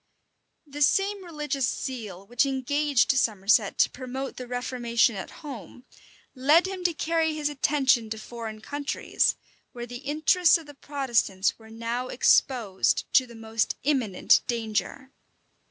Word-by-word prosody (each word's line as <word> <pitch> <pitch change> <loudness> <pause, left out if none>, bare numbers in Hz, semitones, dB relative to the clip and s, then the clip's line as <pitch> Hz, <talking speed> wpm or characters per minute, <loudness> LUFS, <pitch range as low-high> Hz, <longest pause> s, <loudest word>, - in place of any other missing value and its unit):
The 290 0 -9
same 390 +6 +2
religious 295 -6 -2
zeal 210 -8 -5
which 240 +3 +1
engaged 275 +1 +1
Somerset 215 -4 +2
to - - +4
promote 260 +1 -6
the 250 - -7
reformation 245 -2 0
at 190 - -6 0.2
home, 250 - -9 0.5
led 290 +7 +4
him 380 -1 -5
to 345 - +3
carry 320 0 0
his 300 -1 -1
attention 265 -5 +2
to 220 - -4
foreign 220 -1 -8
countries; 285 +5 -1 0.4
where 240 -1 -6
the 245 0 -8
interests 315 +6 +3
of 330 - -12
the 290 - -12
Protestants 240 -10 -1
were 220 0 -15
now 230 +3 -4
exposed 235 -6 +2
to 255 - +5
the 235 - -13
most 225 0 -2
imminent 250 -9 +2
danger. 235 +3 -3
255 Hz, 140 wpm, -26 LUFS, 230-290 Hz, 0.5 s, to